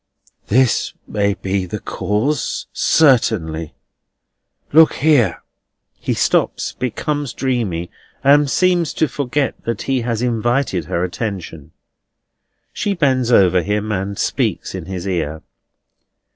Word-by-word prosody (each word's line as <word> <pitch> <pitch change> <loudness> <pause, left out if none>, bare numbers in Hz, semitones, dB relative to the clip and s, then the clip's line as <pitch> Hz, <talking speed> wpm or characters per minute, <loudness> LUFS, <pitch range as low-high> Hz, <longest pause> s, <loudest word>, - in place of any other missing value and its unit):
"That 125 +2 +2
may 100 -1 0
be 95 -1 -2
the 105 +4 -5
cause, 115 +9 -2
certainly. 80 - +2 1.0
Look 160 +1 +7
here." 135 - +2 0.6
He - - -2
stops, - - +1
becomes 140 +2 -3
dreamy, 110 -10 -2 0.3
and 145 +1 +5
seems 175 0 +2
to 160 - +2
forget 140 0 -2
that 115 -3 -2
he 135 -2 0
has 115 0 -2
invited 120 - 0
her 85 +1 -1
attention. 90 -5 -5 1.0
She 205 -2 -1
bends 130 -7 +1
over 95 -5 +5
him, 105 +3 -2
and 100 0 -3
speaks - - -1
in - - -6
his 95 0 -5
ear. 80 -4 -2
115 Hz, 115 wpm, -19 LUFS, 95-135 Hz, 1.0 s, Look